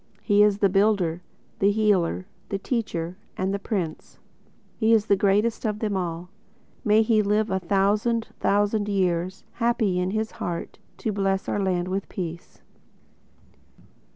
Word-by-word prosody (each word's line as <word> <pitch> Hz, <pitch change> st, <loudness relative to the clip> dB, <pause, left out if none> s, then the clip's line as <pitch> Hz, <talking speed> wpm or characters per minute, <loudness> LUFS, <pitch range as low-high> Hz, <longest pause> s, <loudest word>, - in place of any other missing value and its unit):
He 205 Hz, -1 st, +4 dB
is 210 Hz, -1 st, +4 dB
the 205 Hz, -, +4 dB
Builder, 195 Hz, -4 st, +2 dB, 0.4 s
the 200 Hz, -, +4 dB
Healer, 200 Hz, -4 st, +1 dB, 0.2 s
the 200 Hz, -, -1 dB
Teacher 185 Hz, -6 st, -3 dB, 0.2 s
and 190 Hz, +1 st, -1 dB
the 200 Hz, -, -1 dB
Prince; 185 Hz, -7 st, -4 dB, 0.6 s
He 225 Hz, 0 st, +3 dB
is 215 Hz, -2 st, +4 dB
the 200 Hz, -, +4 dB
greatest 205 Hz, +4 st, +1 dB
of 210 Hz, -2 st, -1 dB
them 210 Hz, -2 st, -2 dB
all. 175 Hz, -1 st, -3 dB, 0.5 s
May 215 Hz, -1 st, +4 dB
he 220 Hz, -1 st, +3 dB
live 210 Hz, +1 st, +1 dB
a 190 Hz, -, +1 dB
thousand 205 Hz, +5 st, +1 dB
thousand 205 Hz, +1 st, +1 dB
years, 185 Hz, -1 st, 0 dB
Happy 230 Hz, -5 st, +1 dB
in 180 Hz, 0 st, 0 dB
his 215 Hz, +2 st, -2 dB
heart, 170 Hz, -1 st, -5 dB, 0.3 s
To 220 Hz, -, +2 dB
bless 195 Hz, -1 st, 0 dB
our -, -, -1 dB
land 185 Hz, -2 st, 0 dB
with 190 Hz, +1 st, -3 dB
Peace. 170 Hz, -2 st, -7 dB
200 Hz, 150 wpm, -25 LUFS, 185-215 Hz, 0.6 s, He